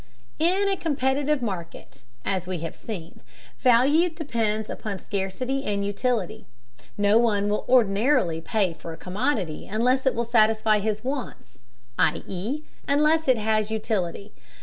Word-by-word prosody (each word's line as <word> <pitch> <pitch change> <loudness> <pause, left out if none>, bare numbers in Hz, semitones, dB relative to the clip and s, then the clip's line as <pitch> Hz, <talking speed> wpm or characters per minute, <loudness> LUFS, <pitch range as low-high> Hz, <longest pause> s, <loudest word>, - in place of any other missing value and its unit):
In 370 +5 +2
a 395 - +2
competitive 285 -3 0
market, 170 - -6 0.2
as 185 -2 -1
we 180 -3 -3
have 165 - -5
seen, 180 -6 -8 0.4
value 275 +8 +4
depends 230 -10 -2
upon 205 -3 -5
scarcity 205 +9 -3
and 200 -3 -1
utility. 220 +1 -2 0.5
No 205 +2 +4
one 205 -3 +2
will 210 - 0
ordinarily 210 - +3
pay 195 -1 0
for 165 0 -8
a - - -10
commodity 185 - -2
unless 250 +6 +1
it 265 - +2
will 235 +1 0
satisfy 220 -2 +3
his 215 +1 -2
wants, 250 - -5 0.4
i.e. 225 +12 -1 0.2
unless 305 +2 +3
it 255 -2 +4
has 215 0 +1
utility. 210 -3 -2
220 Hz, 135 wpm, -25 LUFS, 195-265 Hz, 0.5 s, value